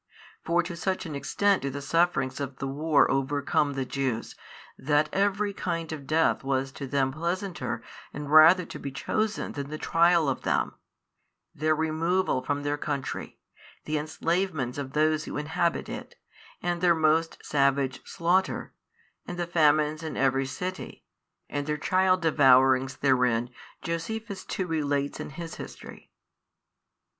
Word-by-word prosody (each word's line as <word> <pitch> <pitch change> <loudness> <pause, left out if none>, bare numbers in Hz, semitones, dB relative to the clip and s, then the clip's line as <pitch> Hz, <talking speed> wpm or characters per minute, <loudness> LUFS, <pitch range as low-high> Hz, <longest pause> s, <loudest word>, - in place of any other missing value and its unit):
For 175 +1 +2
to 170 0 -6
such 185 +2 -2
an 160 - -6
extent 195 +8 +1
do 140 - -2
the 140 +1 -5
sufferings 145 -2 +1
of 140 -1 -4
the - - -4
war 145 +2 +2
overcome 140 +1 +1
the 135 -1 -2
Jews, 130 -3 -2 0.4
that 145 +2 +1
every 200 +1 +1
kind 165 -4 -3
of 145 -4 -7
death 160 -2 +2
was 135 0 -1
to 140 - -7
them 135 -1 +1
pleasanter 170 - -3 0.3
and 145 0 -6
rather 165 +4 +8
to - - -9
be 140 - -5
chosen 215 +9 -2
than 140 -1 -5
the 155 - -5
trial 170 0 +3
of 135 - -1
them: - - 0 0.8
their 155 +1 +1
removal 160 0 0
from 145 +2 -2
their 145 0 -1
country, 145 -3 -4 0.5
the 155 0 -1
enslavements 155 -3 -1
of 135 -1 -6
those 155 0 +2
who - - -5
inhabit 160 +3 -1
it - - -7 0.5
and 175 0 -1
their 175 -2 +5
most 160 +1 +2
savage 140 -2 +1
slaughter 180 +3 0 0.5
and 175 - -5
the 175 - -1
famines 155 -2 +2
in 160 -1 -5
every 135 0 +2
city 185 +7 -6 0.4
and 145 0 -3
their 150 0 -1
child 185 +3 +2
devourings 130 -3 +4
therein 125 -3 +2 0.3
Josephus 200 +4 -4
too 190 - -3
relates 145 -4 -1
in - - -5
his 165 +3 -7
history. - - -10
155 Hz, 150 wpm, -27 LUFS, 140-170 Hz, 0.8 s, rather